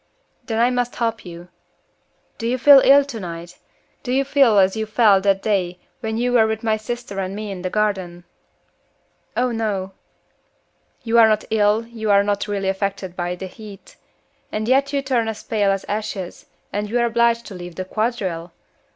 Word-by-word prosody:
"Then 225 -3 -3
I 240 +2 +3
must 245 -1 -1
help 230 -1 -2
you. 175 0 -10 0.9
Do 230 - -2
you 250 +2 0
feel 275 +2 +8
ill 280 +1 +6
tonight? 175 -9 -8 0.4
Do 250 - -5
you 270 +2 +2
feel 270 -6 +4
as 190 0 +4
you 220 0 -3
felt 215 -3 +4
that 195 -1 +2
day 185 -4 0 0.2
when 220 -2 -3
you 245 +1 0
were 225 -2 +5
with 220 0 -3
my 220 -1 +2
sister 215 -2 -6
and 190 0 -3
me 210 -1 -5
in 185 -2 -6
the 185 - -3
garden?" 190 -4 -2 1.1
"Oh 250 0 +1
no." 205 -4 -2 1.1
"You 235 0 +3
are 225 - +8
not 215 -1 +1
ill, 215 +1 +2
you 225 -2 -5
are 200 0 +5
not 205 0 -1
really 200 -2 -2
affected 195 -1 -3
by 175 0 -3
the 190 - -7
heat 205 +1 -12 0.6
and 215 +1 -3
yet 275 +2 +2
you 280 -1 -1
turn 250 -4 0
as 220 -1 -5
pale 205 -3 0
as 195 0 0
ashes, 205 -3 -5 0.3
and 205 0 -2
you 240 - 0
are 235 - +3
obliged 235 0 +2
to - - -9
leave 175 -2 -9
the 185 - -4
quadrille! 190 -6 -3
215 Hz, 185 wpm, -21 LUFS, 195-235 Hz, 1.1 s, feel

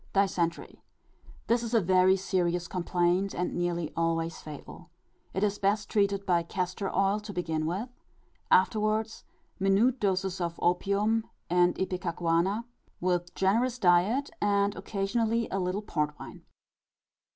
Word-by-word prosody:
Dysentery. 180 -4 -1 0.6
This 235 +1 +2
is 235 0 -2
a - - +6
very 185 0 +4
serious 180 -2 -1
complaint, 180 +1 0
and 180 - -2
nearly 175 -2 -2
always 165 0 -1
fatal. 155 +3 -10 0.4
It 190 - -2
is 205 0 0
best 205 +1 0
treated 200 -1 +1
by 175 -2 +3
castor 185 +3 -3
oil 195 +2 +1
to 210 0 -8
begin 160 -4 -2
with; 190 +8 -2 0.6
afterwards, 215 +3 +2 0.3
minute 205 +7 +3
doses 190 -2 -1
of 170 -1 -2
opium 200 +5 +1 0.2
and 175 0 +4
ipecacuanha, 180 +2 0 0.4
with 175 -1 -1
generous 230 +6 +1
diet 200 +8 +3
and 200 0 +2
occasionally 220 +4 -1
a 195 - -1
little 185 +3 -2
port 150 -5 -2
wine. - - -11
190 Hz, 130 wpm, -29 LUFS, 175-205 Hz, 0.6 s, a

